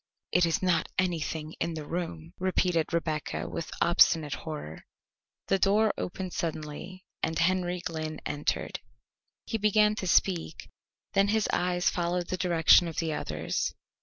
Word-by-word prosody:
"It 175 -1 +4
is 165 +2 0
not 180 -2 +2
anything 160 -3 -1
in 170 - -1
the 155 -2 -5
room," 165 0 -5
repeated 180 -3 +1
Rebecca 160 -2 -2
with 165 - -5
obstinate 165 -3 +4
horror. 150 - -7 0.6
The 195 - +1
door 210 +3 +3
opened 185 0 -5
suddenly 165 +3 -5 0.2
and 160 - -1
Henry 180 0 +1
Glynn 155 -2 -4
entered. 145 0 -2 0.7
He 225 - -2
began 210 0 +4
to 185 - -3
speak, 175 -3 +1 0.4
then 200 0 +4
his 215 0 +2
eyes 180 0 +1
followed 175 0 -1
the - - 0
direction 175 -1 +5
of 165 - -7
the 160 -2 0
others'. 80 - -2
170 Hz, 140 wpm, -29 LUFS, 160-185 Hz, 0.7 s, direction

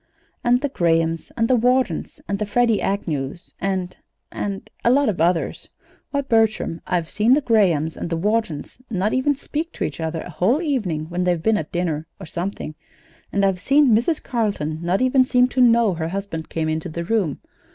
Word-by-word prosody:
"And 245 +1 +3
the 285 - -1
Grahams 165 - 0
and 230 -1 +2
Whartons, 250 -6 +1
and 200 0 -2
the 210 - 0
Freddie 230 0 +2
Agnews, 170 -5 -3
and 185 -2 -2 0.4
and 200 -1 -4 0.2
a - - +4
lot 275 +1 +4
of 175 -6 -2
others. 170 0 0 0.4
Why, 280 - 0
Bertram, 225 -9 +1
I've 175 -3 0
seen 225 +5 +4
the 300 - +1
Grahams 180 - +2
and - - -5
the 165 - -1
Whartons 210 0 -2
not 205 -1 0
even 270 +3 +2
speak 310 +4 -4
to - - -3
each 145 - -4
other 160 0 -2
a - - -8
whole 190 - +2
evening, 210 - -1
when 180 +1 -1
they've 175 -2 0
been 220 -1 +3
at 155 - -3
a - - -45
dinner, 165 -3 -2
or 190 - -8
something; 170 -2 -4 0.6
and 200 0 +2
I've 190 -2 +1
seen 280 +5 +4
Mrs. 295 +8 +1
Carleton 200 - -1
not 180 +7 +1
even 255 0 +4
seem 250 -1 +4
to 255 - +1
know 230 -4 +5
her 160 -1 -3
husband 180 -3 -5
came 160 -1 -2
into 160 +2 -2
the 170 +2 -4
room. 185 -6 0
195 Hz, 195 wpm, -22 LUFS, 165-240 Hz, 0.6 s, know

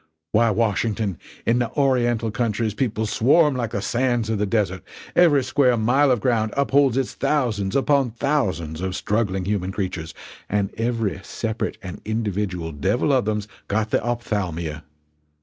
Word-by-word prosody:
Why, 115 +2 +4
Washington, 110 -2 0 0.3
in 120 +1 +3
the 120 -2 0
Oriental 120 -5 +1
countries 110 -1 -1
people 110 -2 -1
swarm 130 +8 +3
like 120 -3 -1
the 100 - -3
sands 120 -2 0
of 110 - -1
the 105 - +1
desert; 95 -4 0 0.3
every 150 -6 +5
square 130 -1 +3
mile 130 +6 +3
of 125 -5 +2
ground 110 -3 +1
upholds 140 -2 +3
its 135 -2 -1
thousands 120 -9 0
upon 140 -1 +3
thousands 100 - -1
of 95 0 -2
struggling 100 -3 -1
human 95 -2 -1
creatures 90 -5 -4 0.3
and 100 -1 0
every 115 -3 -1
separate 110 +1 -3
and 95 -1 -7
individual 100 -6 -2
devil 100 - +1
of 130 -5 +2
them's 105 -1 -1 0.2
got 110 +1 -1
the - - +2
ophthalmia! 90 -10 -3
110 Hz, 150 wpm, -23 LUFS, 100-125 Hz, 0.3 s, every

